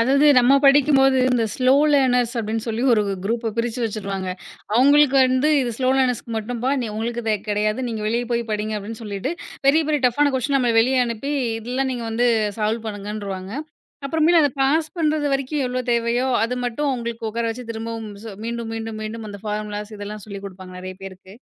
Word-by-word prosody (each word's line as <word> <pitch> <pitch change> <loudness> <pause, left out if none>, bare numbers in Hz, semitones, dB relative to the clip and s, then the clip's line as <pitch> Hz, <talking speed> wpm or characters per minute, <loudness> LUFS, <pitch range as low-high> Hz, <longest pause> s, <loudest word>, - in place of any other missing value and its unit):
அதாவது 275 +5 +4
நம்ம 250 +2 +5
படிக்கும்போது, 275 -1 +5
இந்த 235 -2 +2
ஸ்லோ 255 0 +3 0.2
லேர்னர்ஸ் 250 -3 +3
அப்படின்னு 220 0 -2
சொல்லி 225 +2 -2
ஒரு 215 - +3 0.2
குரூப்ப 230 +1 -1
பிரிச்சு 235 +1 -1
வச்சிருவாங்க. 200 -3 -3 0.5
அவங்களுக்கு 280 +2 +5
வந்து 255 +3 +2
இது 240 - -2
ஸ்லோ 255 - +1
லேர்னர்ஸ்க்கு 250 -3 0
மட்டும்ப்பா. 240 +4 -2 0.2
உங்களுக்கு 235 +2 -3
இது 220 -1 +2
கிடையாது. 215 +3 0
நீங்க 225 -2 -4
வெளிய 235 +2 0
போய் 235 0 +1
படிங்க 215 0 -2
அப்படின்னு 220 +3 -8
சொல்லிட்டு, 210 - -3 0.3
பெரிய 305 +4 +5
பெரிய 300 -2 +1
டஃப்னா 285 +4 +2
குவெஸ்டியன் 275 +2 0
நம்மள 240 -2 +2
வெளிய 250 +1 +3
அனுப்பி 235 +5 -3 0.3
இதெல்லாம் 255 +4 -2
நீங்க 240 -2 -4
வந்து 240 +2 +1 0.3
சால்வ் 220 +2 -1
பண்ணுங்கன்றுவாங்க. 205 -2 -5 0.5
அப்புறமேல் 320 +3 +3
அதை 290 - +3
பாஸ் 310 +4 +2
பண்றது 305 -2 +1
வரைக்கும் 275 +1 -1
எவ்ளோ 250 0 -2
தேவையோ, 235 +2 +1 0.2
அத 240 +2 -1
மட்டும் 265 +5 -2
அவுங்களுக்கு 235 -2 -4
உக்கார 230 +1 -2
வச்சு 250 +2 -5
திரும்பவும் 225 -1 -5
சொ 225 - -7
மீண்டும், 235 -1 -4
மீண்டும், 225 -1 -5
மீண்டும் 215 0 -6
அந்த 205 -1 -8
ஃபார்முலாஸ் 210 0 -4
இதெல்லாம் 205 0 -7
சொல்லி 200 -1 -6
குடுப்பாங்க 185 -1 -10
நெறைய 185 0 -7
பேருக்கு. 190 0 -11
235 Hz, 175 wpm, -22 LUFS, 215-260 Hz, 0.5 s, நம்ம